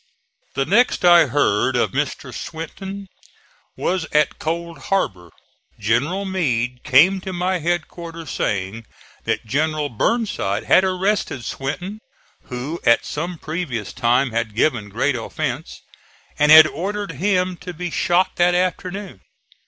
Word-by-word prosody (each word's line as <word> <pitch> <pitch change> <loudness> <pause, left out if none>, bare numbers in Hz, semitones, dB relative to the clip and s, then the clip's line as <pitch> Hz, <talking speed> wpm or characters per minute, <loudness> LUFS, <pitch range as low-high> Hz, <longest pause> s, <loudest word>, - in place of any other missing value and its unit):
The 135 - +1
next 205 - +3
I 175 -3 +7
heard 130 -2 +1
of 120 - +1
Mr. 135 -2 -3
Swinton 190 - -7 0.7
was 180 -3 -1
at 150 0 +2
Cold 170 +1 -4
Harbor. 95 - -1 0.5
General 135 - 0
Meade 125 -10 -1
came 180 +9 +5
to 190 - -5
my 180 +1 -1
headquarters 170 0 -4
saying 100 +3 -2 0.4
that - - -1
General 150 +4 0
Burnside 120 - -1
had 185 - +5
arrested 185 - -1
Swinton, 180 +10 -4 0.5
who 135 +6 -5
at 115 - +4
some 170 +3 -4
previous 155 - -4
time 125 +1 +2
had 115 -2 -2
given 115 -5 +1
great 130 +6 0
offence, 115 - -4 0.6
and 150 +1 +5
had 155 0 +11
ordered 200 +4 -3
him 180 +3 0
to 180 - -8
be 175 +1 -5
shot 175 +2 +1
that 175 0 +3
afternoon. 185 - -2
160 Hz, 130 wpm, -21 LUFS, 125-180 Hz, 0.7 s, had